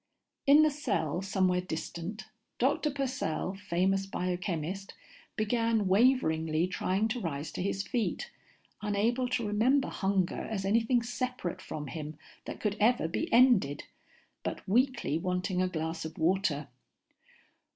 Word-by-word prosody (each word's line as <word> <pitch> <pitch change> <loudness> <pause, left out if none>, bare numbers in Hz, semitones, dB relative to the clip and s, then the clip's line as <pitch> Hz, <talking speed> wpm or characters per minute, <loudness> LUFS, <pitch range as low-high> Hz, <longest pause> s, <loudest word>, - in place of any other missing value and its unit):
In 290 +2 +8
the 310 - +4
cell 180 - -1
somewhere 185 -2 +1
distant, 175 +4 -5 0.3
Dr. 275 +4 +2
Purcell, 260 - -2
famous 195 0 0
biochemist, 180 0 -3 0.4
began 225 -1 +1
waveringly 170 -8 +3
trying 190 +3 0
to 245 +2 -2
rise 155 -6 -4
to - - -4
his 195 +1 -1
feet, 250 - -2 0.5
unable 220 +5 +1
to 250 -2 0
remember 240 +7 +2
hunger 195 -2 0
as 195 -3 -2
anything 230 +4 +2
separate 245 -6 -3
from 150 -1 -6
him 150 +1 -6 0.3
that - - -6
could 210 -1 -1
ever 220 -5 +3
be 165 - -3
ended, 230 - +4 0.6
but - - -5
weakly 235 - +2
wanting 180 +1 -1
a 185 - +2
glass 160 -1 -3
of 160 0 -7
water. 165 -4 +1
195 Hz, 130 wpm, -30 LUFS, 170-235 Hz, 0.6 s, In